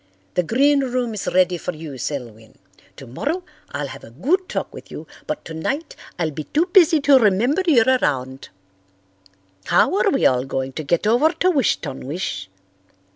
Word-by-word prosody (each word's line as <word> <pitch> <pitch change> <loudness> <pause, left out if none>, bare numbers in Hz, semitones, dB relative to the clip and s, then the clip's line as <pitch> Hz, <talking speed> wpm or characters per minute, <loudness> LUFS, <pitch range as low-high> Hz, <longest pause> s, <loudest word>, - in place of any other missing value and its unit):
The - - +2
green 275 - +3
room 250 -3 -1
is 210 - -5
ready 180 -1 +2
for 180 - -4
you, 155 -4 -8
Selwyn. 115 -5 -6 0.4
Tomorrow 280 - -4 0.3
I'll 145 0 -4
have - - -10
a - - -11
good 310 - -1
talk - - -4
with - - -11
you, - - -8 0.2
but 305 -1 -4
tonight 270 - -4 0.2
I'll 165 -3 -1
be 150 +1 -6
too 315 +4 +1
busy 340 -4 +6
to 280 -2 +6
remember 230 - +2
you're 245 -9 +5 0.2
around. 130 -1 -2 1.2
How - - +3
are - - +3
we - - +1
all 125 0 +3
going 135 0 -3
to 155 - -5
get 170 +6 0
over 240 +8 +4
to 370 - +2
Wish 275 - +2
ton 135 -4 -7
wish? 115 - -4
180 Hz, 175 wpm, -21 LUFS, -, 1.2 s, busy